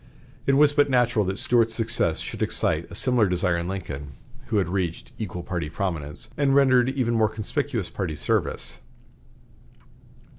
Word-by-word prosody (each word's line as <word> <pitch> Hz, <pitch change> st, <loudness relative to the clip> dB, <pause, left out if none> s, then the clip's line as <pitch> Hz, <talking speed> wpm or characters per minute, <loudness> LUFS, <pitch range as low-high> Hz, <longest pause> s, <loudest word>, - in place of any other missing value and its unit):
It 135 Hz, -, +4 dB
was 145 Hz, +1 st, +5 dB
but 145 Hz, -1 st, +3 dB
natural 120 Hz, -5 st, +2 dB
that 95 Hz, +1 st, -2 dB
Stuart's 115 Hz, -2 st, +2 dB
success 115 Hz, -8 st, +1 dB
should -, -, -6 dB
excite -, -, 0 dB
a -, -, -9 dB
similar 120 Hz, -6 st, +3 dB
desire 90 Hz, -1 st, +1 dB
in 85 Hz, 0 st, -3 dB
Lincoln, 75 Hz, -7 st, -6 dB, 0.3 s
who 110 Hz, -, 0 dB
had 95 Hz, -, +1 dB
reached 90 Hz, -2 st, -3 dB
equal 90 Hz, -5 st, -5 dB
party 85 Hz, -4 st, -3 dB
prominence, 80 Hz, -1 st, -3 dB
and 140 Hz, -2 st, +2 dB
rendered 130 Hz, -3 st, +5 dB
even 130 Hz, -3 st, 0 dB
more 110 Hz, -2 st, +3 dB
conspicuous 110 Hz, -, -2 dB
party 90 Hz, -6 st, -4 dB
service. 70 Hz, -, -1 dB
105 Hz, 155 wpm, -25 LUFS, 90-125 Hz, 0.3 s, was